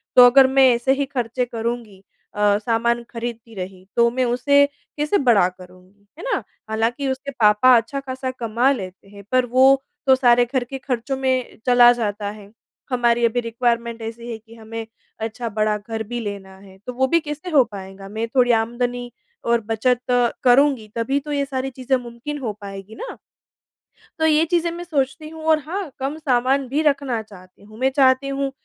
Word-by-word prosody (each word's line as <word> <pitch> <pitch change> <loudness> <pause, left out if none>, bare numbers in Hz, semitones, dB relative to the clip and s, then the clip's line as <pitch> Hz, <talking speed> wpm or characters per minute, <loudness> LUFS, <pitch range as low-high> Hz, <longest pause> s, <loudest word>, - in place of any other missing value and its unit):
तो 250 - +10
अगर 265 +1 +6
मैं 265 0 +5
ऐसे 245 +3 +1
ही 280 +1 -1
ख़र्चे 250 -2 -2
करुँगी 230 -4 -5 0.3
अ, 205 -1 +3
सामान 235 +2 0
खरीदती 230 -1 -6
रही 185 0 -7
तो 235 0 +4
मैं 255 +1 0
उसे 280 +4 +4 0.3
कैसे 300 +7 +1
बड़ा 235 - +4
करूँगी, 185 +2 -18
है - - -8
ना। - - -1 0.3
हालाँकि 230 +6 -1
उसके 265 +2 -4
पापा 215 +4 +6
अच्छा-खासा 260 0 -3
कमा 235 +3 +2
लेते 190 -7 -6
हैं 200 0 -13
पर 255 -1 +3
वो 265 +2 +4 0.3
तो 265 - +7
सारे 245 -2 +4
घर 260 -2 +1
के 270 +3 -7
ख़र्चों 260 0 -3
में 260 -1 -1
चला 245 -1 +7
जाता 210 -3 -3
है। 205 -1 -13 0.4
हमारी 240 -2 +2
अभी 235 +1 +1
रेक्विरमेंट 235 0 -1
ऐसी 230 +1 -7
है 225 - -5
कि 225 +1 -17
हमें 225 0 -7 0.3
अच्छा 225 +2 -4
बड़ा 215 0 +2
घर 220 +2 -5
भी 240 +3 -5
लेना 200 -3 -7
है। 190 -1 -16
तो 250 - -4
वो 265 +2 +1
भी 335 +5 +3
कैसे 300 +2 -6
हो 290 -6 +5
पाएगा? 195 -3 -10
मैं 220 +3 -3
थोड़ी 245 -2 +4
आमदनी 245 +1 -3 0.3
और 235 0 +2
बचत 235 +3 -1
अ, 245 -1 +3
करुँगी 255 -2 +4
तभी 235 +5 0
तो 295 +1 -8
ये 285 -1 0
सारी 270 -1 -3
चीज़ें 260 +1 0
मुमकिन 245 +4 -7
हो 230 -6 -3
पाएगी 195 +1 -9
ना। - - -7 1.0
तो 320 - +2
ये 315 0 +4
चीज़ें 340 0 +1
मैं 345 +1 -6
सोचती 305 -2 -2
हूँ। 320 0 -10
और 315 -1 +4
हाँ, 360 0 -4
कम 275 +3 -3
सामान 265 -1 +1
भी 280 +5 0
रखना 275 -6 0
चाहती 190 -3 -16
हूँ। 215 +1 -15
मैं 260 +1 +3
चाहती 265 -1 +4
हूँ 275 0 -2
245 Hz, 185 wpm, -21 LUFS, 225-270 Hz, 1.0 s, तो